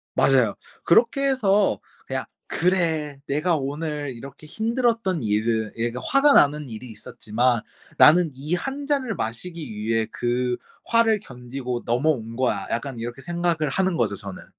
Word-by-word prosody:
맞아요. 125 -6 +4 0.3
그렇게 245 +9 +3
해서 205 - +2 0.3
그냥 - - -3 0.2
'그래 160 -5 0
내가 155 +5 +1
오늘 145 0 -3
이렇게 140 +5 -11
힘들었던 225 - 0
일을' 110 +1 0
예 115 +1 0
그러니까 125 +2 -6
'화가 280 +2 +5
나는 145 - +4
일이 115 +2 -8
있었지만 115 +2 -1 0.4
나는 165 +2 +7
이 150 +6 -4
1 275 +8 -4
잔을 270 -7 0
마시기 150 +5 -5
위해 110 +1 0
그 125 0 -1 0.3
화를 230 -2 +3
견디고 125 -5 -6
넘어온 120 -2 0
거야.' 115 -6 0
약간 120 +1 -3
이렇게 120 +3 -6
생각을 170 -2 -1
하는 190 +1 +1
거죠 105 -4 0
저는. 100 -1 -8
145 Hz, 310 characters per minute, -24 LUFS, 120-180 Hz, 0.4 s, 나는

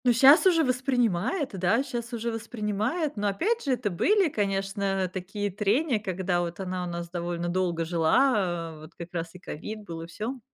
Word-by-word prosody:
Ну 245 - +6
щас 275 +9 +7
уже 335 -3 +5
воспринимает, 255 - +1
да, 200 +8 +3
щас 240 -3 -5
уже 235 0 -2
воспринимает. 225 - -2
Но 205 0 0
опять 415 - 0
же, 275 - +1
это 210 -5 -1
были, 385 - +3
конечно, 195 -3 -1
такие 195 +2 -3
трения, 220 - +1
когда 185 -3 -1
вот 175 +1 -4
она 185 -1 -3
у - - -4
нас 170 0 -5
довольно 175 0 -3
долго 175 -2 0
жила, 175 0 +2
э, - - -13
вот 155 +2 -13
как 170 +1 -8
раз 165 0 -4
и, - - -7
э, - - -20
ковид 210 +7 -7
был, 165 -4 -7
и 165 - -7
всё. 220 +10 -5
200 Hz, 195 wpm, -27 LUFS, 175-245 Hz, -, щас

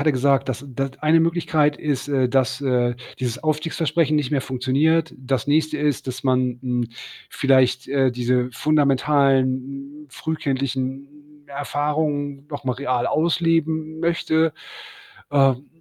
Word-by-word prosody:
hatte 155 +1 +3
gesagt, 135 +1 +2
dass 130 +1 -3
n 135 -3 -12
da 135 +1 -1
eine 155 +2 +4
Möglichkeit 160 -3 +1
ist, 145 -3 -2
äh, 135 -3 +2
dass, 130 0 +1
äh, 125 -3 +1 0.2
dieses 125 -3 -3
Aufstiegsversprechen 155 0 0
nicht 145 -3 0
mehr 145 -3 +1
funktioniert. 140 +6 +1
Das 130 0 -2
Nächste 155 +1 +1
ist, 145 -3 -1
dass 130 0 -5
man, 130 -1 +1
hm, 125 -2 -1 0.4
vielleicht, 130 -2 +2
äh, 135 -2 +2
diese 125 +1 0
fundamentalen, 140 0 +1
frühkindlichen 135 -2 -3 0.4
Erfahrungen 145 0 -2
noch 145 -1 -6
mal 130 - 0
real 125 -2 -1
ausleben 160 -1 0
möchte. 165 -2 +1 0.8
Ähm, 135 -1 +3
140 Hz, 130 wpm, -22 LUFS, 130-155 Hz, 0.8 s, eine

